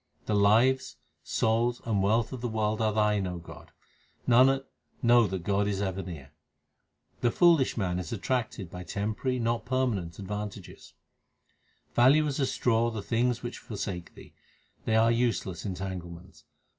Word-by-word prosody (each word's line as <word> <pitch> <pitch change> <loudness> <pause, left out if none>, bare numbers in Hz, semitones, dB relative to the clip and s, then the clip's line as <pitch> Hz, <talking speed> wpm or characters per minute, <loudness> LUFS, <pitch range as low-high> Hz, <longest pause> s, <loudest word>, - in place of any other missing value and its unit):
The 110 - -1
lives, 115 +6 +3 0.2
souls, 115 +2 0
and 105 -4 +1
wealth 110 +5 +1
of 125 - -6
the 120 - -1
world 110 -1 -1
are 110 -1 +2
Thine, 105 -2 +1
O 90 -1 -4
God. 85 - -12 0.6
Nanak, 135 +3 +5 0.4
know 120 -1 +5
that 95 -2 -4
God 100 +2 +1
is 100 -2 -1
ever 95 -1 -2
near. 80 -7 -9 0.9
The 120 - +2
foolish 165 -2 +4
man 90 -4 -1
is 90 -3 -6
attracted 110 -5 -2
by 90 - -7
temporary 110 +7 -2
not 115 -2 -1
permanent 120 -10 -1
advantages: 105 -1 -7 1.0
Value 135 +6 +5
as 145 -2 -2
a 135 - +2
straw 115 -2 +1
the 110 -3 -5
things 120 +2 0
which 120 - -5
forsake 95 -5 -6
thee; - - -14
l - - -36
They 110 - +1
are 115 +1 +4
useless 115 -8 -1
entanglements. 90 -3 -7
110 Hz, 155 wpm, -28 LUFS, 95-120 Hz, 1.0 s, Nanak